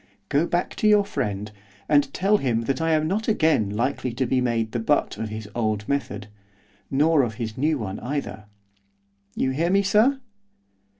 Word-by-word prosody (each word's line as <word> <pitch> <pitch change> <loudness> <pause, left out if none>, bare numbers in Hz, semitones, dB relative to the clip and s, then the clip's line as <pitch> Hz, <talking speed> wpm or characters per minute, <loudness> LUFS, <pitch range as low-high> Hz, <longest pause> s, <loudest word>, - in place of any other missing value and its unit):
Go 150 +5 +2
back 175 +1 -1
to 215 - +2
your 210 -1 +5
friend, 105 - -3 0.4
and 145 -2 +3
tell 200 +6 +2
him 120 - 0
that 130 +4 -2
I 165 0 +2
am 155 0 +2
not 210 +6 -1
again 160 - +2
likely 125 +4 -1
to 130 +2 -1
be 130 +1 +1
made 115 -3 0
the 120 - -2
butt 145 +6 +1
of 110 - -3
his 110 -1 -6
old 110 -3 -1
method, 105 -8 -2 0.6
nor 150 +2 +3
of 115 -4 -2
his 110 -2 -5
new 150 +3 +1
one 100 -6 -5
either. 110 -6 -4 0.9
You 130 - 0
hear 165 +6 0
me, 200 +2 +3
sir? 220 +8 +3
135 Hz, 180 wpm, -24 LUFS, 110-160 Hz, 0.9 s, your